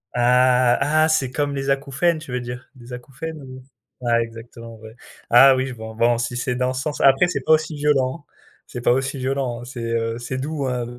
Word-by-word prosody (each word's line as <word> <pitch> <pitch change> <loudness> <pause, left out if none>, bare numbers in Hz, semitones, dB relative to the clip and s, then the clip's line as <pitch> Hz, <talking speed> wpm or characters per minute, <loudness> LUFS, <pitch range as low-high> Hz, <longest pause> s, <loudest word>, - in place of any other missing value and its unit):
Ah, 125 0 +4
ah 155 +2 +2
c'est 135 -5 +1
comme 145 +1 -2
les 135 0 -1
acouphènes, 140 +5 0
tu 155 -5 -11
veux 125 - -2
dire? 125 +1 -8
Des 125 0 -12
acouphènes 140 +5 -8
ou 130 -1 -11 0.4
ah, 115 0 +2
exactement, 115 0 -9
ouais. 110 +1 -13 0.3
Ah 130 +3 +7
oui, 130 0 -1
je 130 - -6
vois, 110 -1 -9
bon, 120 0 +3
si 120 +1 -3
c'est 125 0 -2
dans 130 +1 -1
ce 130 - -3
sens, 150 -1 -4
après 135 +6 +5
c'est 180 - -3
pas 160 - +3
aussi 155 0 +1
violent. 145 0 0 0.4
C'est 120 - -7
pas 120 - +3
aussi 135 +2 -1
violent, 130 -2 -2
heu, 120 - -9
c'est, 125 -1 -8
heu, 115 0 -2
c'est 130 +2 -5
doux, 140 0 -3
hein, 125 -2 -2
130 Hz, 220 wpm, -21 LUFS, 120-140 Hz, 0.4 s, Ah